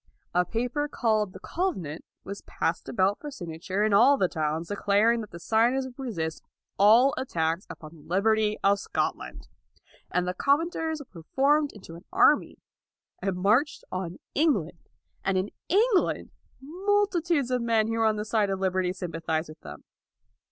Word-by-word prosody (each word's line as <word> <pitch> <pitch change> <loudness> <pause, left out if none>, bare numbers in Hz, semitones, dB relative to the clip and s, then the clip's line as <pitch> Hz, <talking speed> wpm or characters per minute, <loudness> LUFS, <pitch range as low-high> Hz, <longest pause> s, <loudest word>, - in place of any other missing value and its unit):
A 180 0 +3
paper 245 - -2
called 215 -7 0
the - - -11
Covenant 185 - -3 0.2
was 200 - -7
passed 165 - -2
about 195 -1 +1
for 295 - -7
signa 170 - -8
ture 190 +4 -1
in 215 -1 +2
all 255 +8 +6
the 185 - +2
towns, 160 0 -2
declaring 205 +3 +2
that 210 - -8
the 170 - -10
signers 235 +8 +2
would 260 0 -11
resist 165 -10 -3 0.4
all 230 +7 +6
attacks 165 -7 -1
upon 155 -1 -10
the 160 - -15
liberty 215 +5 +1
of 200 +1 +4
Scotland. - - -3 0.6
And 180 0 0
the 180 - -1
Covenanters 315 - 0
were 170 - -10
formed 290 +2 +3
into 190 -5 -12
an 170 +3 -12
army, 395 +4 +3 0.6
and 195 -2 -1
marched 215 +11 +2
on 185 -1 -4 0.2
England. 205 - +1 0.4
And 195 -1 +1
in 190 +2 -1 0.2
England 410 +1 +2 0.3
multitudes 345 -3 0
of 250 -1 +1
men 230 -2 +2
who 225 - -2
were 225 - +3
on 220 -1 +3
the 210 0 -3
side 215 -2 +1
of 195 -1 -2
liberty 185 -1 0
sympathized 165 -3 -3
with 155 - -12
them. 75 0 -10
210 Hz, 165 wpm, -27 LUFS, 180-270 Hz, 0.6 s, all